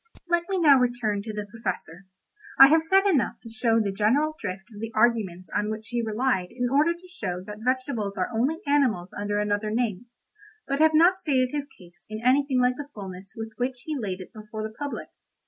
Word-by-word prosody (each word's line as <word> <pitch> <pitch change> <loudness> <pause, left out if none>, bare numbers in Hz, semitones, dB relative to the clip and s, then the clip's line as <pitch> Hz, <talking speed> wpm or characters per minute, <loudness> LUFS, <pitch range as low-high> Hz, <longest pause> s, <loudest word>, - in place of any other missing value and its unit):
Let 345 +1 +1
me 385 - 0
now 295 -6 +6
return 240 -5 0
to 215 +2 -6
the 210 -1 -4
Professor. 195 -4 -5 0.5
I 270 - +10
have 320 +1 +5
said 385 +5 +3
enough 335 -11 +2
to 230 - -9
show 230 -1 +2
the 205 -3 0
general 240 +11 +2
drift 185 +1 -5
of 205 - -10
the 225 0 -4
arguments 215 -6 +1
on 210 +1 0
which 220 +1 -6
he 240 -1 -1
relied 220 -3 0
in 245 0 -2
order 295 +4 +4
to 345 +2 -14
show 180 - -5
that 210 +1 -9
vegetables 250 -5 -1
are 185 - -1
only 275 +10 0
animals 250 -11 +2
under 205 0 -2
another 210 +1 0
name, 225 -1 -1 0.6
but 275 +1 -1
have 315 0 +5
not 355 +4 +5
stated 255 -4 +1
his 290 -1 -3
case 175 -1 -18
in 215 0 -5
anything 265 0 +3
like 250 0 +2
the 290 -1 -7
fullness 195 -1 -8
with 225 0 -5
which 250 0 -3
he 310 - -3
laid 195 -8 -4
it 185 - -12
before 215 0 -7
the 220 0 -5
public. 285 +4 -5
230 Hz, 210 wpm, -26 LUFS, 205-280 Hz, 0.6 s, I